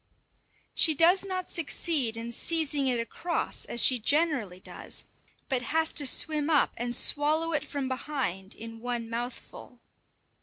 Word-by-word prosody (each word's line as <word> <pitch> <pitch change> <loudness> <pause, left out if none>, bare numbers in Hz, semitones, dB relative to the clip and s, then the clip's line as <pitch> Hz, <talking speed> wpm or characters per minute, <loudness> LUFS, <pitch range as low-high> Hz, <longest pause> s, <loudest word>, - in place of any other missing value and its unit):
She 315 - +4
does 350 +6 +6
not 370 -2 -4
succeed 290 -7 0
in 230 +1 -5
seizing 290 +1 -1
it 245 -2 +1
across 335 +9 -2
as 235 - +3
she 255 -2 +4
generally 270 - +1
does, - - -6 0.4
but 260 -3 0
has 320 +5 0
to 290 -3 +3
swim 305 +2 +1
up 305 -3 +3
and 240 +1 -1
swallow 310 +5 +2
it 300 - +1
from 280 -2 -4
behind 260 -8 -3
in 225 0 -9
one 235 -1 -4
mouthful. 240 +1 -7
275 Hz, 145 wpm, -28 LUFS, 235-315 Hz, 0.4 s, does